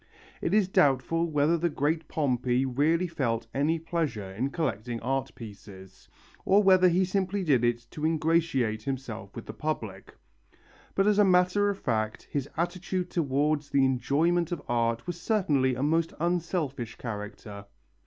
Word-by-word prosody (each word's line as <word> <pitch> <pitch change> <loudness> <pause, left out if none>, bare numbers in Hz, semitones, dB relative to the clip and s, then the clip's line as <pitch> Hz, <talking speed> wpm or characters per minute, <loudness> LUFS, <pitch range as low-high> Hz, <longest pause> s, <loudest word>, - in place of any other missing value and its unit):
It - - -1
is 205 -2 +3
doubtful 165 +1 +2
whether 155 +2 +2
the 170 +1 +1
great 155 +2 -1
Pompey 125 -3 0
really 150 +7 +1
felt 120 -9 -2
any 150 +4 +1
pleasure 155 - -3
in 120 +8 -2
collecting 120 - -3
art 135 +2 -2
pieces, 100 -4 -12 0.3
or 200 +2 +4
whether 185 -1 +6
he 180 +2 +2
simply 190 +1 -1
did 135 -8 +2
it 120 0 0
to 150 - -8
ingratiate 155 -8 +1
himself 110 -6 -6
with 115 - -7
the 110 - -7
public. 110 -7 -5 0.8
But 195 - +3
as 210 0 +3
a - - +7
matter 185 +2 +3
of 200 - -2
fact 110 - -2
his 140 -1 -2
attitude 180 +1 -2
towards 145 -1 0
the 135 -1 +3
enjoyment 160 +7 +1
of 170 -4 -4
art 115 -1 0
was 175 -1 -5
certainly 145 - +1
of 125 - -4
a - - 0
most 165 +2 +1
unselfish 165 -8 -2
character. 105 -2 -7
145 Hz, 155 wpm, -28 LUFS, 120-170 Hz, 0.8 s, a